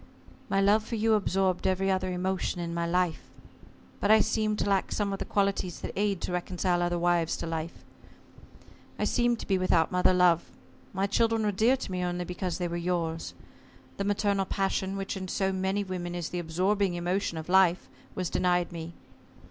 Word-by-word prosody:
"My 195 0 +2
love 205 +2 +4
for 230 - -4
you 220 0 +2
absorbed 190 -3 +1
every 190 +1 +1
other 185 -1 0
emotion 185 0 -2
of 170 -1 -3
my 170 0 -1
life. 180 -1 0 0.7
But 205 - 0
I 220 0 +7
seemed 215 -1 +1
to - - 0
lack 195 -1 +1
some 205 -2 -1
of 195 - -4
the - - -3
qualities 195 -3 -1
that - - -5
aid 200 -2 0
to - - -3
reconcile 180 0 0
other 175 0 0
wives 170 -1 +1
to - - -5
life. 165 0 -5 1.1
I - - -2
seemed 240 -1 +2
to - - -7
be 190 -2 +2
without 170 -3 +2
mother 180 0 +3
love. 180 -2 +3 0.4
My 190 +1 0
children 225 +2 +1
were 210 - +2
dear 225 +7 +3
to 250 - -6
me 180 -1 -2
only 175 0 -2
because 180 0 -3
they 180 -2 -1
were 170 0 -3
yours. 170 -2 -2 0.6
The 200 - -1
maternal 200 -1 +1
passion, 195 0 -1
which 195 0 -3
in 190 -1 -5
so 190 +1 0
many 190 +2 0
women 180 -2 -5
is 175 -2 -3
the 175 - -3
absorbing 185 +3 0
emotion 175 0 -1
of 160 - -6
life, 185 -1 +4 0.3
was 185 -2 -2
denied 180 -1 +1
me. 165 0 -7
185 Hz, 195 wpm, -28 LUFS, 175-200 Hz, 1.1 s, I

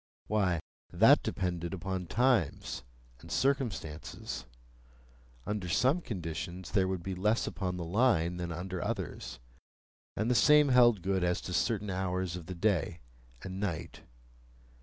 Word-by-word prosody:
Why, 95 -5 +1 0.3
that - - +6
depended 90 -1 -2
upon 95 -1 -4
times 120 - +1 0.4
and - - -12
circumstances. 115 - -2 1.0
Under 105 -4 -3
some 135 - +3
conditions 90 - -5
there 95 -4 +3
would 95 -2 -3
be 95 +2 -3
less 105 +5 +1
upon 90 -2 -3
the 85 - -4
Line 90 -3 +2
than 85 -1 -4
under 90 +2 -4
others, - - -4 0.8
and 110 - 0
the 125 - +3
same 150 +6 +6
held 120 -7 +5
good 95 -1 +1
as 90 0 +1
to 90 - -6
certain 105 0 0
hours 90 -1 -1
of 90 -2 -8
the 90 - -5
day 85 -3 0 0.4
and 95 0 -5
night. 95 -5 -4
95 Hz, 140 wpm, -31 LUFS, 90-110 Hz, 1.0 s, that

